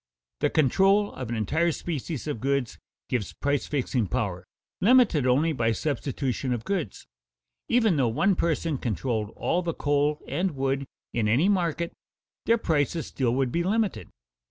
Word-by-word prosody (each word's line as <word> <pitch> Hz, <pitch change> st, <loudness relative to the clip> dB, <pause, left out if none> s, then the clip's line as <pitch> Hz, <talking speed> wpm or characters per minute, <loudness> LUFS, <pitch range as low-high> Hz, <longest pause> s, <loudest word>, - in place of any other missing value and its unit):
The -, -, +2 dB
control 195 Hz, +8 st, +3 dB
of 125 Hz, -3 st, -6 dB
an 120 Hz, -, -2 dB
entire 160 Hz, -, +1 dB
species 155 Hz, -3 st, -4 dB
of 150 Hz, -7 st, -3 dB
goods 135 Hz, -1 st, -1 dB, 0.3 s
gives 120 Hz, -6 st, -2 dB
price 145 Hz, -1 st, -1 dB
fixing 125 Hz, -5 st, -1 dB
power, 100 Hz, -8 st, -2 dB, 0.3 s
limited 210 Hz, -, +4 dB
only 150 Hz, +6 st, +3 dB
by 115 Hz, -4 st, +1 dB
substitution 135 Hz, -1 st, -2 dB
of 115 Hz, -2 st, -3 dB
goods. 175 Hz, -, -3 dB, 0.6 s
Even 225 Hz, -8 st, +3 dB
though 130 Hz, -3 st, +3 dB
one 155 Hz, -, +2 dB
person 165 Hz, -4 st, 0 dB
controlled 110 Hz, -2 st, -2 dB
all 175 Hz, -, 0 dB
the 170 Hz, -2 st, -3 dB
coal 145 Hz, +1 st, +1 dB
and 180 Hz, -3 st, -1 dB
wood 135 Hz, 0 st, -1 dB, 0.3 s
in 115 Hz, -3 st, +1 dB
any 130 Hz, -, +3 dB
market, 170 Hz, -4 st, 0 dB, 0.5 s
their 230 Hz, -, +5 dB
prices 160 Hz, -, 0 dB
still 125 Hz, -3 st, -1 dB
would 130 Hz, -2 st, +1 dB
be 170 Hz, -, 0 dB
limited. 210 Hz, +3 st, 0 dB
145 Hz, 155 wpm, -26 LUFS, 125-170 Hz, 0.6 s, their